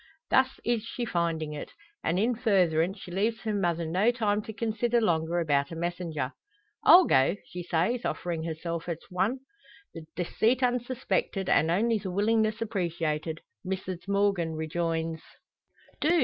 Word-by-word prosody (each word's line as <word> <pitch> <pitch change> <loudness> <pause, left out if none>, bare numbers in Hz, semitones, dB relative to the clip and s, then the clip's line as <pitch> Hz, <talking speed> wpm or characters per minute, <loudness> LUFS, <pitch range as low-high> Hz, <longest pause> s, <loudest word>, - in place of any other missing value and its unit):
Thus 260 0 +3
is 235 -2 +1
she 235 +1 -4
finding 165 -5 -1
it; 150 - -7 0.3
and 170 - +1
in 225 +6 +2
furtherance 190 -6 +2
she 185 - -10
leaves 215 +5 0
her 215 -2 -2
mother 170 -4 0
no 185 +8 +2
time 215 -4 +1
to 220 - -7
consider 230 +2 0
longer 170 -5 +1
about 145 -4 +1
a - - -5
messenger. 165 -5 -3 0.5
"I'll 355 +2 +9
go!" 135 - +4
she 180 - -7
says, 180 +8 0
offering 170 -2 -2
herself 165 +1 -4
as 170 - -2
one. 200 +9 0 0.5
The 160 -1 -9
deceit 225 +8 +1
unsuspected, 245 -5 0
and 160 - +4
only 220 +6 +2
the 195 - -5
willingness 220 +3 +1
appreciated, 165 -6 -2 0.2
Mrs 185 -1 -4
Morgan 200 -5 +1
rejoins: 165 0 -2 0.8
"Do! 330 +3 +3
185 Hz, 150 wpm, -28 LUFS, 165-225 Hz, 0.8 s, I'll